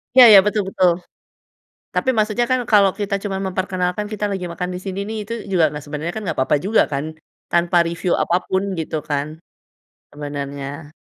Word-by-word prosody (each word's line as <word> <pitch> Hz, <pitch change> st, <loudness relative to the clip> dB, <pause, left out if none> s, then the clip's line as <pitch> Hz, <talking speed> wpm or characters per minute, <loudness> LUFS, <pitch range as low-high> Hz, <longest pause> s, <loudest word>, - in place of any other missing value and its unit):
Ya 245 Hz, -4 st, +10 dB
ya, 200 Hz, -, +11 dB
betul 210 Hz, +1 st, +1 dB
betul. 180 Hz, -2 st, +3 dB, 0.9 s
Tapi 260 Hz, -, -1 dB
maksudnya 215 Hz, +2 st, +1 dB
kan 255 Hz, +1 st, +1 dB
kalau 200 Hz, -3 st, +5 dB
kita 200 Hz, -1 st, -2 dB
cuma 195 Hz, -1 st, -4 dB
memperkenalkan 185 Hz, 0 st, -2 dB
kita 210 Hz, -1 st, -3 dB
lagi 190 Hz, -2 st, -3 dB
makan 175 Hz, +1 st, -4 dB
disini 185 Hz, +2 st, -5 dB
nih 220 Hz, -, -4 dB
itu 230 Hz, -, -5 dB, 0.2 s
juga 170 Hz, -4 st, +4 dB
nggak 150 Hz, -, -6 dB
sebenernya 150 Hz, +4 st, -4 dB
kan 220 Hz, -, -5 dB
nggak 200 Hz, -, -4 dB
apa-apa 130 Hz, +3 st, +2 dB
juga 205 Hz, +6 st, +3 dB
kan, 155 Hz, +3 st, -4 dB, 0.3 s
tanpa 170 Hz, 0 st, +3 dB
review 170 Hz, +1 st, -1 dB
apa 175 Hz, -, +2 dB
pun 190 Hz, -1 st, -1 dB
gitu 155 Hz, -1 st, -3 dB
kan, 150 Hz, +3 st, -3 dB, 0.7 s
sebenernya. 145 Hz, +1 st, -6 dB
180 Hz, 175 wpm, -20 LUFS, 155-205 Hz, 0.9 s, ya